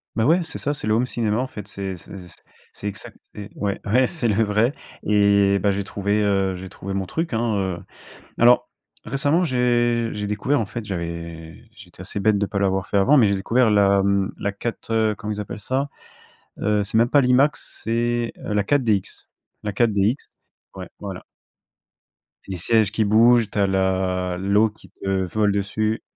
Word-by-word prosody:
Beh, 110 - +1
ouais, 165 +9 +4
c'est 160 - -6
ça, 145 - -1
c'est 145 -7 -5
le 110 - +2
home 120 +3 +2
cinéma 110 -4 -1
en 130 +2 -1
fait. 105 -6 -9
C'est 95 -2 -5
c'est 90 - -11
c 90 -3 -12 0.4
c'est 105 - -6
exact 100 -1 -7 0.2
et 105 -1 -8
ouais, 100 -1 -2
ouais 125 +5 +3
c'est 160 -9 -2
le 110 +1 +2
vrai 105 +4 +2 0.3
et, 100 -1 +3
bah, 100 - +2
j'ai 100 +1 -2
trouvé, 100 +1 -1
heu, 95 -2 +1
j'ai 95 +1 -8
trouvé 100 +2 -7
mon 95 -1 -2
truc, 165 - -3
hein, 115 -1 0
heu, 95 -3 -2 0.6
alors 120 +1 +5 0.4
récemment 145 +6 +1
j'ai 120 -4 +1
j'ai 105 0 -4
découvert 120 +6 0
en 110 - -1
fait 110 +3 -6
j'avais 85 0 -6
j'ai 100 -3 -14
été 90 - -14
assez 100 +2 -5
bête 105 +1 +3
de 100 - 0
pas 100 0 -3
l'avoir 95 -1 0
fait 100 - -1
avant 130 +10 +5
mais 115 -6 +5
j'ai 100 - +1
découvert 115 +4 +2
la 100 -1 +4
mmh 100 0 +1
la 100 - -2
4 115 +3 -6
heu, 110 -1 +2
comment 105 0 -4
ils 105 - -4
appellent 105 +1 -7
ça? 135 +6 -2 0.7
Heu, 105 0 +1
c'est 105 +2 -1
même 120 +1 +3
pas 145 - +5
l'Imax 130 +3 +1
c'est, 120 +1 0
heu, 105 - -2
la 105 -1 +2
4DX 110 -5 0 0.3
la 105 - -2
4DX, 105 +1 +2 0.6
ouais, 95 -1 -7
voilà. 95 -3 -7 1.2
Les 95 - -4
sièges 110 +3 +2
qui 110 0 +1
bougent, 115 +2 +4
tu - - -7
as 100 - +3
la 95 -1 0
l'eau 100 +3 +3
qui 105 -3 -19
te 95 -1 -2
vole 105 +3 +1
dessus. 105 +2 -1
105 Hz, 195 wpm, -22 LUFS, 100-115 Hz, 1.2 s, alors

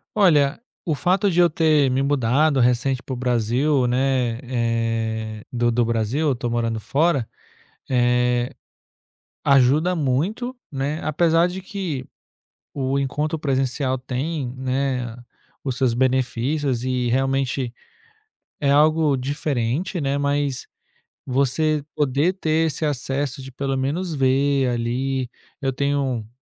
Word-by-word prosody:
Olha, 150 -9 +4 0.3
o 160 -4 0
fato 185 +6 +2
de 175 -1 +1
eu 175 -1 +6
ter 155 -3 +3
me 130 +1 +1
mudado 140 +1 +2
recente 125 +2 +2
para 135 - -6
o - - -2
Brasil, 125 +3 +1
né, 125 -2 +1
eh, 115 -3 -2
do 120 -1 +1
do 120 0 +2
Brasil, 115 +5 0
eu - - +2
estou 120 -1 -3
morando 115 -1 -1
fora, 140 0 +1 0.6
eh, 125 0 +2 0.9
ajuda 140 +7 +4
muito, 170 - -1 0.2
né, 140 +2 -2
apesar 165 +2 +3
de 185 +1 -6
que 185 -10 -4 0.7
o 135 0 -1
encontro 150 +4 -1
presencial 135 -2 0
tem, 130 +2 -3
né, 130 -2 -1 0.5
os 130 -3 -2
seus 130 -3 +2
benefícios 130 +1 0
e 125 -1 0
realmente 135 -1 0 0.9
é 140 - +2
algo 150 0 +4
diferente, 140 +4 -2
né, 140 0 0
mas 140 -2 -1 0.6
você 140 +4 +1
poder 145 +5 +1
ter 160 -3 +1
esse 160 - -3
acesso 135 -1 -2
de 135 0 -9
pelo 135 +1 -2
menos 160 +7 -2
ver, 135 0 +2
ali. 125 +2 -1 0.3
Eu 135 -1 0
tenho 135 -4 -1
135 Hz, 125 wpm, -22 LUFS, 125-150 Hz, 0.9 s, eu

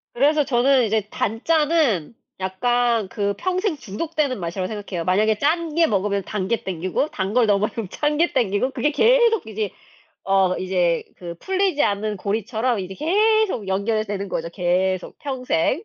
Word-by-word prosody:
그래서 290 +4 +3
저는 255 0 +3
이제 220 0 +1
단짠은 275 - +1 0.2
약간 230 +3 0
그 200 0 -1
평생 370 - -1
중독되는 285 +2 -3
맛이라고 180 +2 -3
생각해요. 200 -5 -5
만약에 210 +4 +2
짠 320 +1 0
게 335 -1 +4
먹으면 200 -1 0
단 190 0 -3
게 230 +1 -1
당기고 185 - -2
단 195 -4 -3
걸 245 -2 +3
너무 200 -1 +2
많이 - - -6
먹으면 225 -5 -4
짠 295 +7 -1
게 340 +2 +2
당기고 235 +1 +1
그게 295 +2 0
계속 465 +3 +3
이제 215 -2 -3 0.5
어 195 -1 +2
이제 180 -3 0
그 170 -1 -8
풀리지 380 - 0
않는 210 +1 -1
고리처럼 220 +3 -1
이제 190 0 -6
계속 405 - +1
연결이 205 +3 0
되는 200 -1 -4
거죠, 165 -2 -3
계속 185 +1 0
평생. 260 - -1
220 Hz, 335 characters per minute, -22 LUFS, 190-295 Hz, 0.5 s, 게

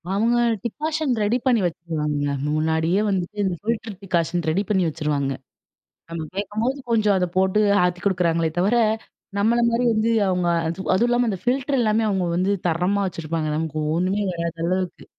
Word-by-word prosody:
அவங்க 230 +3 +2 0.3
decoction 305 +3 -1
ready 225 +4 +2
பண்ணி 240 -4 +3
வச்சுருவாங்க. 155 -4 -2 0.3
முன்னாடியே 160 +5 +1
வந்துட்டு, 190 +1 -2
இந்த 185 -2 0
ஃபில்டர் 220 -2 -3
டிகாஷன் 175 -2 0
ரெடி 185 +6 +1
பண்ணி 190 -3 +2
வச்சுருவாங்க. 145 -3 -1 0.8
நம்ம 165 -1 -4
கேட்கும்போது 215 +7 -2
கொஞ்சம் 210 -3 +3
அதை 180 - +1
போட்டு 190 +2 +3 0.2
ஆத்தி 180 0 0
குடுக்குறாங்களே 170 -4 +1
தவிர, 200 +7 +2 0.6
நம்மள 225 +4 +3
மாரி 235 +2 +1
வந்து 220 +1 +1 0.2
அவங்க, 180 -1 +1 0.5
அதுவும் 230 +6 +2
இல்லாம 240 -1 +2
அந்த 195 - -3
ஃபில்டர் 265 +2 +1
எல்லாமே 220 -1 +2
அவங்க 190 -3 0
வந்து 185 +3 +1 0.2
தரமா 180 +5 +1
வச்சுருப்பாங்க. 165 -2 -3
நமக்கு 160 -1 -3 0.2
ஒண்ணுமே 185 +4 0
வராத 170 -1 -3
அளவுக்கு. 185 0 -2
190 Hz, 150 wpm, -23 LUFS, 170-220 Hz, 0.8 s, பண்ணி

